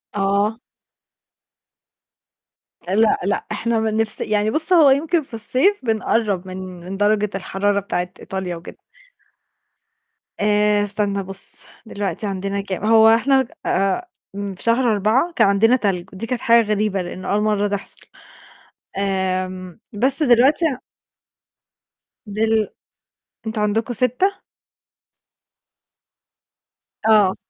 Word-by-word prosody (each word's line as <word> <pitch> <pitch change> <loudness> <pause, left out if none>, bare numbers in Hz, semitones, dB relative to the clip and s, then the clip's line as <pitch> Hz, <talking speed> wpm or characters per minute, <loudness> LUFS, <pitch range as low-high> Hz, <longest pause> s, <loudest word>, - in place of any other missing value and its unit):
آه. 200 +3 0 2.3
لأ، 210 +4 +3
لأ، 200 +2 -1
إحنا 230 -1 -1
بنفس 220 0 -1
يعني 210 0 0
بُص 320 +7 +1
هو 320 -5 +7
يمكن 315 +5 +2
في 270 - -22
الصيف 255 - +1
بنقرب 215 -4 0
من 185 - -7 0.3
من 195 +2 -6
درجة 210 0 +2
الحرارة 200 +1 0
بتاعة 180 -2 -3
إيطاليا 190 -2 -5
وكده. 165 0 -11 1.6
آآ، 210 0 +2
استنى 200 -1 -1
بُص 195 +1 -5 0.2
دلوقتي 205 0 -4
عندنا 195 +1 -3
كام 195 0 -5
هو 220 0 +6
إحنا 265 +3 +3 0.2
آآ، 195 - 0 0.3
في 200 -2 -6
شهر 235 +1 +2
4 220 - +1
كان - - +4
عندنا 220 +5 +4
تلج 195 -6 -2
ودي 225 +5 -6
كانت 250 -1 -3
حاجة 230 -1 +4
غريبة 210 -2 0
لأنه 185 +1 -6
أول 205 +1 +2
مرة 210 -1 +1
تحصل، 200 -1 -5 1.0
آمم، 185 -2 -2
بس 260 +8 0
دلوقتي 265 +5 +4 1.6
دل 215 +1 +1 0.8
أنتم 220 -1 -2
عندكم 220 +3 0
6 255 - 0 2.6
آه. 210 -4 +5
210 Hz, 110 wpm, -20 LUFS, 195-230 Hz, 2.6 s, هو